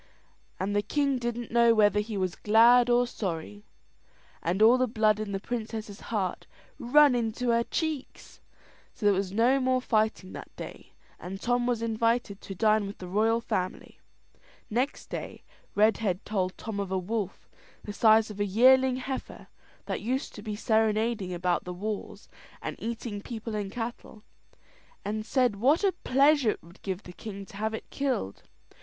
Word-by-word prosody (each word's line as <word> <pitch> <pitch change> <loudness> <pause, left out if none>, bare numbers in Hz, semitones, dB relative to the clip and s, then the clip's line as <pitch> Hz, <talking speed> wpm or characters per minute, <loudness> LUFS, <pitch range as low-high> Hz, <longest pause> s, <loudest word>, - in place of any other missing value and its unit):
And 200 +2 -1
the 205 - +3
king 275 +5 0
didn't 240 -1 -4
know 235 0 +5
whether 210 -1 +4
he 210 0 -3
was 185 -2 -1
glad 235 +3 +5
or 245 0 +4
sorry, 160 - -5 0.8
and 175 +4 -1
all 230 +4 +6
the 255 - +2
blood 215 -2 +2
in 215 -2 -4
the 195 - -2
princess's 220 -2 -5
heart 195 -5 -2 0.3
run 285 +3 +5
into 240 +1 -1
her 235 0 +3
cheeks. 310 0 -4 0.5
So 210 - -5
there 205 - +6
was 190 -1 -1
no 240 +6 +3
more 255 -1 +2
fighting 215 -5 0
that - - -8
day, - - -10 0.3
and 190 +2 -7
Tom 245 +2 0
was 235 -2 0
invited 230 -2 0
to 195 - -8
dine 215 0 +2
with 200 - -8
the 180 - -8
royal 220 +5 +2
family. 185 -5 -4 0.7
Next 250 +6 -1
day, - - -6 0.3
Redhead 210 -2 +2
told 185 -3 -2
Tom 215 -2 -5
of 195 -2 -3
a 190 - +1
wolf, 200 +1 -4 0.4
the 205 - -6
size 220 0 +4
of 205 - -10
a - - +2
yearling 255 +5 +5
heifer, 260 +1 -6 0.4
that - - -3
used 255 +5 -2
to 210 - -9
be 210 0 -4
serenading 220 -2 +1
about 175 0 0
the 180 - -6
walls, 210 +3 -5 0.3
and - - -5
eating 225 -2 -4
people 225 0 -6
and 205 -2 -3
cattle; 225 -2 -6 0.8
and 215 +1 -3
said 250 -6 +2
what 280 - +3
a 395 - +4
pleasure 280 -5 +3
it - - -3
would 170 +4 -17
give 190 0 -4
the 180 - -11
king 200 0 -8
to 195 - -12
have 220 +1 -1
it - - -8
killed. 260 - -2
220 Hz, 170 wpm, -28 LUFS, 200-240 Hz, 0.8 s, all